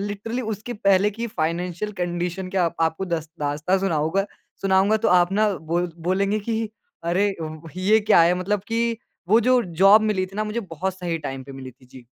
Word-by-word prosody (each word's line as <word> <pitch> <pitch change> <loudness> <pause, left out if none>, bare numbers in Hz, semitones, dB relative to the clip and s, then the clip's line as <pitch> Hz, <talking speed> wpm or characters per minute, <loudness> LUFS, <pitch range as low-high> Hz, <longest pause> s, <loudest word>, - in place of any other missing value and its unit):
Literally 205 +5 -4
उसके 220 +1 -5
पहले 200 -2 +3
की 230 +3 -4
फाइनेंशियल 175 +1 -3
कंडीशन 175 +1 -2
क्या 185 -2 +1
आप 170 - -2
आपको 160 +3 0
दस 160 -3 -3
दास्तान 150 +6 0
सुनाऊँगा 175 0 0 0.4
सुनाऊँगा 195 +2 +3
तो 215 - +1
आप 180 0 +4
ना 215 +2 +3
बोल 170 +2 -2 0.2
बोलेंगे 200 +3 +1
कि 225 +1 -2 0.4
अरे, 190 +4 +1
व 155 +1 -7
ही 185 - -5
ये 220 +1 +6
क्या 210 -3 +5
है? 170 +2 +4
मतलब 190 +3 -1
कि 230 0 0 0.3
वो 220 +3 +5
जो 250 +1 +3 0.2
जॉब 200 +3 +8
मिली 205 -4 0
थी 195 +2 -13
ना 215 - 0
मुझे 215 +2 -3
बहुत 185 -1 -4
सही 170 -2 -2
टाइम 135 -1 -5
पे 135 - -10
मिली 135 -1 -8
थी। 130 +1 -22
जी। 125 -1 -15
190 Hz, 200 wpm, -23 LUFS, 170-210 Hz, 0.4 s, जॉब